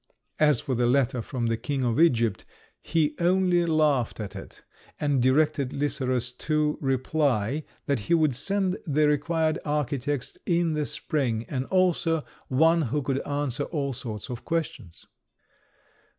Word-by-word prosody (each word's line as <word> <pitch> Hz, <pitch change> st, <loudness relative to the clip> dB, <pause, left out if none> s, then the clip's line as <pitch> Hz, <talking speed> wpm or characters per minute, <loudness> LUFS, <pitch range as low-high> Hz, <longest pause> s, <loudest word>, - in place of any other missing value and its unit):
As 150 Hz, -1 st, +4 dB
for 135 Hz, -, -3 dB
the 120 Hz, 0 st, +1 dB
letter 125 Hz, -1 st, +2 dB
from 120 Hz, +1 st, -3 dB
the 115 Hz, -1 st, 0 dB
King 130 Hz, +3 st, -2 dB
of 120 Hz, +2 st, 0 dB
Egypt, 115 Hz, -, +3 dB, 0.4 s
he 155 Hz, -3 st, +1 dB
only 175 Hz, 0 st, +3 dB
laughed 150 Hz, -8 st, +1 dB
at 105 Hz, -2 st, -6 dB
it, -, -, -10 dB, 0.4 s
and 145 Hz, -3 st, +1 dB
directed 140 Hz, +1 st, +2 dB
Lycerus 130 Hz, -4 st, 0 dB
to 150 Hz, -1 st, 0 dB
reply 135 Hz, -1 st, 0 dB, 0.2 s
that 140 Hz, -3 st, 0 dB
he 105 Hz, +11 st, +1 dB
would 155 Hz, -4 st, +2 dB
send 190 Hz, +7 st, -1 dB
the 150 Hz, 0 st, +3 dB
required 155 Hz, +2 st, +1 dB
architects 145 Hz, -2 st, -2 dB
in 170 Hz, -2 st, +2 dB
the 150 Hz, -2 st, -1 dB
spring, 130 Hz, -6 st, -2 dB
and 130 Hz, -2 st, -3 dB
also 175 Hz, -3 st, +1 dB, 0.2 s
one 160 Hz, +5 st, +4 dB
who 145 Hz, +1 st, -1 dB
could 135 Hz, 0 st, 0 dB
answer 145 Hz, -1 st, -1 dB
all 140 Hz, -5 st, -2 dB
sorts 110 Hz, -4 st, -6 dB
of 120 Hz, -, -6 dB
questions. 135 Hz, -, -4 dB
145 Hz, 145 wpm, -26 LUFS, 125-155 Hz, 0.4 s, As